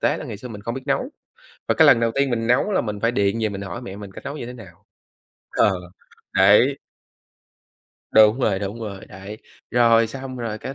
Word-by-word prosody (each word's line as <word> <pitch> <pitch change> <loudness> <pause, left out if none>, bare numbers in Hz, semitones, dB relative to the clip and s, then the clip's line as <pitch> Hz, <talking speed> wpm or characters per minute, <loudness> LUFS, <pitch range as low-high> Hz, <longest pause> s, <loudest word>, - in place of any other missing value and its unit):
tế - - +1
là - - -7
ngày - - -6
xưa 125 +5 -9
mình 105 -3 -9
không 115 +2 -4
biết 130 - -6
nấu, - - 0 0.6
và - - +3
cái - - +5
lần 115 - +6
đầu 115 -1 +2
tiên 140 -1 +1
mình 115 -2 -1
nấu 125 - +2
là - - +2
mình 105 -2 -5
phải 115 - +2
điện 100 -2 0
về 110 - +2
mình 100 -1 -6
hỏi 100 +4 -6
mẹ 95 -4 -8
mình 100 -1 -10
cách - - -11
nấu 140 - -5
như 120 - -6
thế 125 - -7
nào. 100 -9 -14 0.7
Ờ, 105 - +3 0.6
đấy! 105 +8 +5 1.3
Đúng 110 +3 +6
rồi, 100 -6 +1
đúng 100 +3 -5
rồi. 100 -3 -7
Đấy, 95 +3 -10 0.3
rồi 115 -1 +4
xong, 130 +2 -7
rồi 115 -3 -4
cái 135 - -7
115 Hz, 225 wpm, -22 LUFS, 100-125 Hz, 1.3 s, lần